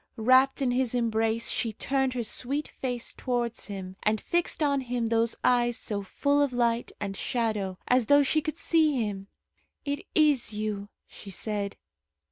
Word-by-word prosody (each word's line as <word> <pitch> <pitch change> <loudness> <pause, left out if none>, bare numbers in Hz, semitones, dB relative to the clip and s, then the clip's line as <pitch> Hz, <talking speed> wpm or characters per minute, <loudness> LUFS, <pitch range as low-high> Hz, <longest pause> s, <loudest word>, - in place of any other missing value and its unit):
Wrapt 260 +4 +4
in 250 - +2
his 250 -1 0
embrace, 225 0 +1
she 225 -2 -1
turned 265 +3 0
her 240 - -1
sweet 275 +6 -1
face 245 -2 -4
towards 240 -2 -2
him, 190 -2 -7
and 215 0 +1
fixed 345 +2 -1
on 280 -2 +2
him 245 -2 -2
those 230 0 +1
eyes 240 -1 +3
so 205 -2 -3
full 285 +9 +1
of 285 -2 +2
light 235 -1 0
and 200 -1 -4
shadow, 210 -5 -1
as 250 -3 +3
though 285 0 +6
she 310 +3 +2
could 310 +1 -4
see 315 -4 +3
him. 205 -5 -2 0.6
"It 285 +6 -3
is 295 -8 +3
you," 210 -1 -3 0.2
she 200 - -12
said. 200 +1 -3
240 Hz, 165 wpm, -28 LUFS, 215-270 Hz, 0.6 s, though